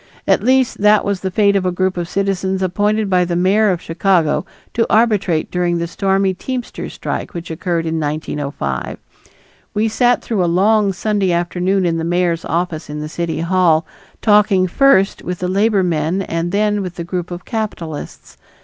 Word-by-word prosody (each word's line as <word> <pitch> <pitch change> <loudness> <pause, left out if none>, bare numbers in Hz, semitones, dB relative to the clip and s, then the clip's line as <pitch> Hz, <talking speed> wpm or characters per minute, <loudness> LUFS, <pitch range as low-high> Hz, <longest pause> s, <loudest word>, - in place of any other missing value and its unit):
At - - +3
least 260 -1 +2
that 210 0 +4
was 200 -2 -1
the 190 - -3
fate 200 +1 +2
of 195 - +1
a 185 - 0
group 185 +1 0
of 175 -1 -4
citizens 190 -1 -1
appointed 205 +3 0
by 180 -2 +3
the 175 0 -2
mayor 200 +5 +3
of 180 -3 -1
Chicago 165 -2 +1 0.3
to 230 - 0
arbitrate 205 -8 +2
during 175 -1 0
the 170 - -1
stormy 195 +2 0
teamsters' 250 +6 -5
strike - - -4
which 170 -1 -6
occurred 165 0 -2
in 160 0 -1
1905. 145 - -3 0.8
We 215 +2 +2
sat 245 +3 +2
through 210 -6 0
a - - +1
long 200 +3 +3
Sunday 200 0 0
afternoon 180 +2 0
in 165 -1 0
the 165 - -2
mayor's 175 0 0
office 170 -1 -2
in 150 0 -5
the 150 - -4
City 165 -1 -3
Hall, 170 -2 +2 0.4
talking 205 -3 +4
first 195 0 +3
with 180 0 -4
the 180 - -3
labor 200 +1 +2
men 170 +2 0
and 165 0 -3
then 210 +1 +1
with 180 -2 -5
the 170 - -5
group 175 0 -4
of 175 0 -7
capitalists. 205 - -6
185 Hz, 180 wpm, -18 LUFS, 170-205 Hz, 0.8 s, that